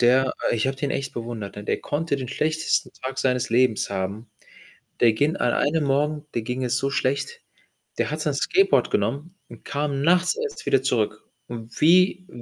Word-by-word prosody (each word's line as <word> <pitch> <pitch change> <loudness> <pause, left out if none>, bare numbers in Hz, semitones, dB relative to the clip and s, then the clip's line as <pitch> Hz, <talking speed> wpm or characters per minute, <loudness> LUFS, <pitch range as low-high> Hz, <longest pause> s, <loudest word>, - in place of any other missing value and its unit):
der 130 +2 +4 0.2
i - - +1
ich 110 - 0
habe 135 - -1
den 140 +1 -2
echt 135 -1 -3
bewundert. 115 -4 -6
Denn 105 - -8
der - - 0
konnte 145 0 -1
den 130 -3 -5
schlechtesten 155 +1 0
Tag 130 0 -4
seines 125 -3 0
Lebens 120 -3 +2
haben. 100 +4 -4 0.7
Der 115 -2 +6
ging 145 +10 +1
an 120 -7 +1
einem 150 +1 +1
Morgen 145 +2 0
dem 115 -2 -2
ging 125 +2 -2
es 125 +1 +1
so 135 - -1
schlecht, 140 - -1 0.6
der - - 0
hat - - -3
sein - - 0
Skateboard 390 +1 +2
genommen 140 - -1
und 120 - -13
kam 145 -1 -2
nachts 175 +4 +3
erst 455 -2 -5
wieder 135 - +3
zurück 110 -5 0 0.2
und 115 -1 -8
wie 185 +3 +4
135 Hz, 190 wpm, -24 LUFS, 120-150 Hz, 0.7 s, Der